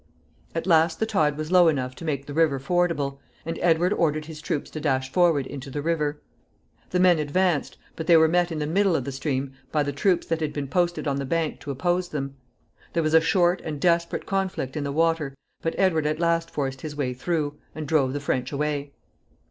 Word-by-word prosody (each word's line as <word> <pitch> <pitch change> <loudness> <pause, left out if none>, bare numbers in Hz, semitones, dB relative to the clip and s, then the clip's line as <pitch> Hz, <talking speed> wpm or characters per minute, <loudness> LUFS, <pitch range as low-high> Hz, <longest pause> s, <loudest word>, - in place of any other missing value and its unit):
At 165 - -2
last 165 -2 +3
the 220 - +2
tide 155 -9 +1
was 155 +2 -4
low 180 -2 +6
enough 130 -5 0
to 165 - -8
make 140 -3 -2
the 145 - -7
river 155 -3 +3
fordable, 145 -2 0 0.3
and 165 +1 -4
Edward 175 +3 +3
ordered 155 -5 0
his 155 -1 -9
troops 155 -3 -3
to 155 - -5
dash 130 -3 0
forward 165 -6 +3
into 140 0 -7
the 145 +2 -4
river. 150 -3 0 0.7
The 180 - 0
men 180 -3 +5
advanced, 155 +1 0 0.2
but 160 - -5
they 170 -2 +7
were 160 0 +6
met 175 +1 +2
in 160 - -3
the 150 - -1
middle 190 +3 +2
of 135 - 0
the 140 - -4
stream 135 0 -2 0.2
by 150 -1 +2
the 145 - -2
troops 180 +5 +1
that 165 -1 -1
had 150 -1 -1
been 145 -2 -3
posted 175 +1 0
on 140 -1 0
the 140 - -2
bank 165 +2 -1
to - - -9
oppose 175 +6 0
them. 140 -2 -4 0.6
There 165 - +1
was 155 0 0
a 160 - +7
short 175 +2 +2
and 150 -2 -4
desperate 170 +1 +1
conflict 190 -9 -2
in 150 - -2
the 140 - -2
water, 160 -2 +1 0.3
but 165 - -2
Edward 160 -6 +2
at 155 +1 -1
last 170 -1 +1
forced 135 -2 -3
his 150 -2 -6
way 135 -4 -1
through, 150 +2 -2 0.2
and 155 -1 -5
drove 140 -4 +2
the 145 - -2
French 130 -2 -2
away. 145 -1 -2
155 Hz, 220 wpm, -25 LUFS, 140-170 Hz, 0.7 s, they